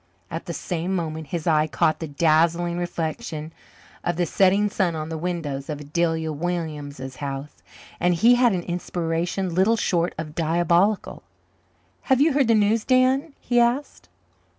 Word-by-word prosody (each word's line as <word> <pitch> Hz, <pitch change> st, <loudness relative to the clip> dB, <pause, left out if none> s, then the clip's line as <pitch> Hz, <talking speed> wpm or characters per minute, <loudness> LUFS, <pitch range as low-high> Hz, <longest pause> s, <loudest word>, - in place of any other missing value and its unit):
At 165 Hz, -, -5 dB
the 170 Hz, -, -3 dB
same 180 Hz, +2 st, -2 dB
moment 160 Hz, -3 st, -3 dB
his 165 Hz, +2 st, -4 dB
eye 155 Hz, -2 st, +3 dB
caught 155 Hz, +1 st, +1 dB
the 160 Hz, -, -4 dB
dazzling 170 Hz, +3 st, +2 dB
reflection 160 Hz, -2 st, -4 dB, 0.5 s
of 175 Hz, -, -1 dB
the 175 Hz, +1 st, +1 dB
setting 195 Hz, +4 st, +3 dB
sun 190 Hz, -4 st, 0 dB
on 155 Hz, 0 st, -4 dB
the 160 Hz, -, -4 dB
windows 155 Hz, -6 st, -3 dB
of 150 Hz, -2 st, -4 dB
Adelia 160 Hz, +1 st, -1 dB
Williams's 150 Hz, -5 st, -4 dB
house, 140 Hz, +1 st, -6 dB, 0.4 s
and 175 Hz, 0 st, +2 dB
he 230 Hz, +9 st, +5 dB
had 245 Hz, -1 st, +4 dB
an 175 Hz, -2 st, -2 dB
inspiration 175 Hz, +1 st, -2 dB
little 195 Hz, +6 st, +3 dB
short 175 Hz, -4 st, 0 dB
of 155 Hz, -1 st, -6 dB
diabolical. 175 Hz, +5 st, +1 dB, 0.9 s
"Have 265 Hz, -1 st, +4 dB
you 300 Hz, +1 st, +4 dB
heard 275 Hz, -3 st, +3 dB
the 230 Hz, -, +4 dB
news, 215 Hz, +1 st, +2 dB
Dan?" 265 Hz, +4 st, +2 dB
he 240 Hz, -1 st, +1 dB
asked. 240 Hz, -, 0 dB
170 Hz, 155 wpm, -24 LUFS, 155-195 Hz, 0.9 s, he